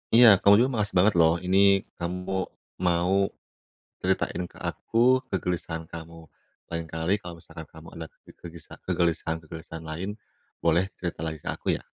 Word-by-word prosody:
Iya, 120 Hz, +1 st, +9 dB
kamu 100 Hz, 0 st, +7 dB
juga 130 Hz, -, +1 dB
makasih 105 Hz, 0 st, -1 dB
banget 100 Hz, +3 st, +5 dB
loh. 80 Hz, 0 st, +5 dB
Ini 95 Hz, +1 st, +2 dB, 0.4 s
kamu 90 Hz, +2 st, -3 dB, 0.6 s
mau 90 Hz, +2 st, +2 dB, 0.9 s
ceritain -, -, 0 dB
ke -, -, -17 dB
aku, 125 Hz, +3 st, +2 dB
kegelisahan 85 Hz, -3 st, -3 dB
kamu. 80 Hz, 0 st, -10 dB, 0.4 s
Lain 85 Hz, -1 st, -4 dB
kali 80 Hz, +3 st, 0 dB
kalau 90 Hz, -2 st, -8 dB
misalkan 80 Hz, -1 st, -10 dB
kamu 80 Hz, +1 st, -13 dB
ada 80 Hz, 0 st, -6 dB
ke -, -, -19 dB
kegisa 85 Hz, -2 st, -11 dB
kegelisahan-kegelisahan 80 Hz, -2 st, -2 dB
lain, 85 Hz, +5 st, -4 dB, 0.5 s
boleh 85 Hz, +2 st, +3 dB, 0.2 s
cerita 85 Hz, -3 st, -4 dB
lagi 80 Hz, -1 st, -4 dB
ke -, -, -12 dB
aku, -, -, -13 dB
ya. -, -, -18 dB
85 Hz, 150 wpm, -26 LUFS, 80-90 Hz, 0.9 s, Iya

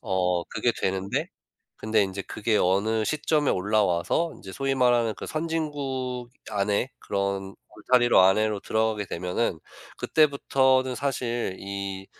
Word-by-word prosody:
어 90 Hz, -2 st, 0 dB
그게 -, -, 0 dB
되는데 95 Hz, +1 st, -1 dB, 0.5 s
근데 110 Hz, -1 st, +2 dB
인제 95 Hz, 0 st, -3 dB
그게 110 Hz, +2 st, -1 dB
어느 105 Hz, +4 st, +2 dB
시점에 150 Hz, -1 st, +1 dB
올라와서 105 Hz, -, +1 dB
인제 95 Hz, -, -10 dB
소위 135 Hz, +6 st, -1 dB
말하는 120 Hz, -3 st, +3 dB
그 -, -, -8 dB
선진국 145 Hz, -6 st, -3 dB, 0.2 s
안에 105 Hz, +4 st, 0 dB
그런 100 Hz, -1 st, -2 dB, 0.2 s
울타리로 120 Hz, -4 st, +4 dB
안에로 100 Hz, +2 st, +3 dB
들어가게 110 Hz, -2 st, 0 dB
되면은 90 Hz, +2 st, -2 dB, 0.4 s
그때부터는 130 Hz, -3 st, +2 dB
사실 120 Hz, -6 st, -2 dB
이 100 Hz, -1 st, -5 dB
110 Hz, 285 characters per minute, -26 LUFS, 95-130 Hz, 0.5 s, 울타리로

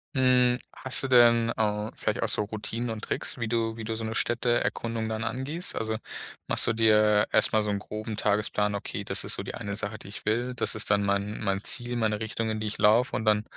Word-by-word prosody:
Hm, 125 Hz, -1 st, +3 dB
hast 130 Hz, 0 st, +5 dB
du 135 Hz, -, -2 dB
denn, 120 Hz, -2 st, +5 dB
au 105 Hz, 0 st, -1 dB
vielleicht -, -, -2 dB
auch -, -, 0 dB
so -, -, +1 dB
Routinen 110 Hz, +3 st, -3 dB
und 110 Hz, -1 st, -6 dB
Tricks, -, -, -3 dB
wie 115 Hz, -2 st, -3 dB
du 115 Hz, -1 st, -1 dB
wie 115 Hz, -, -7 dB
du 110 Hz, +1 st, -3 dB
so 115 Hz, -, -4 dB
'ne 110 Hz, 0 st, -4 dB
Städteerkundung 115 Hz, -1 st, 0 dB
dann 110 Hz, +1 st, -3 dB
angehst? 135 Hz, +9 st, -2 dB
Also 110 Hz, 0 st, -2 dB, 0.5 s
machst -, -, +2 dB
du -, -, +3 dB
dir 105 Hz, -2 st, +3 dB
erstmal 110 Hz, 0 st, +3 dB
so 105 Hz, -, -3 dB
'n 100 Hz, -1 st, -1 dB
groben 110 Hz, +1 st, -6 dB
Tagesplan: 105 Hz, 0 st, 0 dB
„Okay, 100 Hz, -, -5 dB
das -, -, 0 dB
ist -, -, 0 dB
so -, -, -5 dB
die -, -, -6 dB
eine 100 Hz, 0 st, -5 dB
Sache, 105 Hz, +1 st, -3 dB
die -, -, -10 dB
ich 100 Hz, -, -7 dB
will. 120 Hz, +4 st, 0 dB
Das 125 Hz, -, 0 dB
ist 110 Hz, -, -2 dB
dann 100 Hz, 0 st, +2 dB
mein 100 Hz, +1 st, -1 dB
mein 100 Hz, -1 st, -1 dB
Ziel, 120 Hz, 0 st, 0 dB
meine 110 Hz, -2 st, -1 dB
Richtung, 110 Hz, +1 st, -2 dB
in 110 Hz, 0 st, -3 dB
die 110 Hz, -, -2 dB
ich 105 Hz, -, -4 dB
laufe“ 115 Hz, +5 st, +3 dB
und 110 Hz, -, -2 dB
dann 105 Hz, 0 st, +3 dB
110 Hz, 235 wpm, -27 LUFS, 105-120 Hz, 0.5 s, hast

